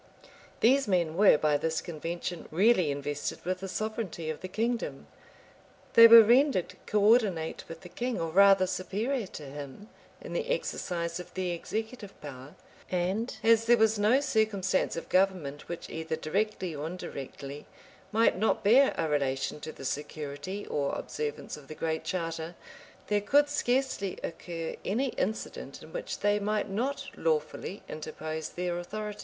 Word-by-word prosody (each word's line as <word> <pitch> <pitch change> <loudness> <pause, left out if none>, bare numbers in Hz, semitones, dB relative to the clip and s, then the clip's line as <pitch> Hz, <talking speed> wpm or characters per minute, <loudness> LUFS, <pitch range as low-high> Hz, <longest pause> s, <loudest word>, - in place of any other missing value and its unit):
These 265 +2 +4
men 175 -5 +1
were, 195 -4 +6
by 150 -1 +2
this 160 +2 -1
convention, 170 +1 -5
really 185 -1 +4
invested 145 +2 -3
with 185 +1 -1
the 195 - -5
sovereignty 200 -5 -3
of 155 - -8
the 185 - -5
kingdom: 230 +5 -2 0.9
they 230 0 +11
were 230 0 +11
rendered 245 - +3
coordinate 205 -6 +2
with 165 0 -8
the 180 - -10
king, 240 +6 -3
or 165 -1 -2
rather 195 +1 +6
superior 215 +6 -2
to 155 - -9
him, 145 - -9 0.3
in - - -8
the 485 0 -2
exercise 175 - -2
of 180 - -9
the 185 -1 -1
executive 220 +4 -5
power; 140 +2 -10 0.3
and 190 +7 -1
as 230 0 +5
there 240 +1 +6
was 220 -1 +3
no 220 +6 +4
circumstance 215 -8 +1
of 165 - -5
government 185 -7 0
which, 170 - -5
either 160 0 -3
directly 185 +2 -1
or 150 +1 -4
indirectly, 140 -4 -7 0.4
might 225 +1 +4
not 215 +4 +1
bear 255 +7 +5
a 165 - 0
relation 140 -1 -1
to 155 - -6
the 135 - -10
security 150 +7 -4
or 140 -1 -1
observance 150 -1 -4
of 145 -2 -14
the 155 - -8
Great 160 0 -2
Charter, 165 -1 -3 0.5
there 205 -1 +1
could 290 +7 +4
scarcely 255 -8 0
occur 165 0 -5
any 250 +8 0
incident 225 - -4
in - - -13
which - - -5
they 205 0 +3
might 210 0 -1
not 270 +7 -2
lawfully 160 +4 -2
interpose 155 0 -5
their 175 0 -3
authority. 210 +3 -5
185 Hz, 155 wpm, -29 LUFS, 160-220 Hz, 0.9 s, they